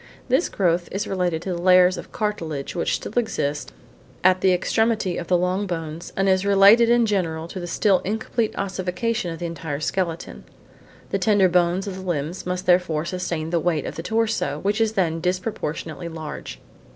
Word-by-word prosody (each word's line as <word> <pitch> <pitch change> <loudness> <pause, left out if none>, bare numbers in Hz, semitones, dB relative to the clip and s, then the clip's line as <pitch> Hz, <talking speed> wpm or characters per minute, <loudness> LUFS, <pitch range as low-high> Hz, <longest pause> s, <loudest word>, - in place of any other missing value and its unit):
This 260 +8 +2
growth 175 -2 0
is 200 +2 -2
related 180 -4 -1
to 185 - -2
the 170 - -4
layers 180 0 +6
of - - -9
cartilage 165 -10 -3
which 170 - 0
still - - -6
exist 150 -11 -1 0.5
at 185 0 +4
the 190 - +4
extremity 215 +1 +1
of 170 - -5
the 180 - +3
long 185 +3 0
bones 165 -1 -5
and 195 0 +2
is 190 0 +3
related 200 +4 +6
in 240 0 +4
general 165 -6 -1
to 185 - -6
the 175 - -5
still 190 +2 +2
incomplete 220 +2 -2
ossification 190 +2 -2
of 165 - -6
the 175 - -5
entire 165 -3 -4
skeleton. 165 - -3 0.7
The 195 - 0
tender 195 0 +4
bones 175 +1 +2
of 195 -2 -5
the - - -7
limbs 175 0 -3
must 180 +1 -3
therefore 175 -3 +2
sustain 170 -3 -3
the 170 - +2
weight 160 -3 0
of - - -4
the - - -4
torso 220 -8 0
which 205 +3 +1
is 220 -1 +2
then 165 -5 0
disproportionately 180 -3 -3
large. 160 -2 -7
180 Hz, 185 wpm, -23 LUFS, 165-200 Hz, 0.7 s, layers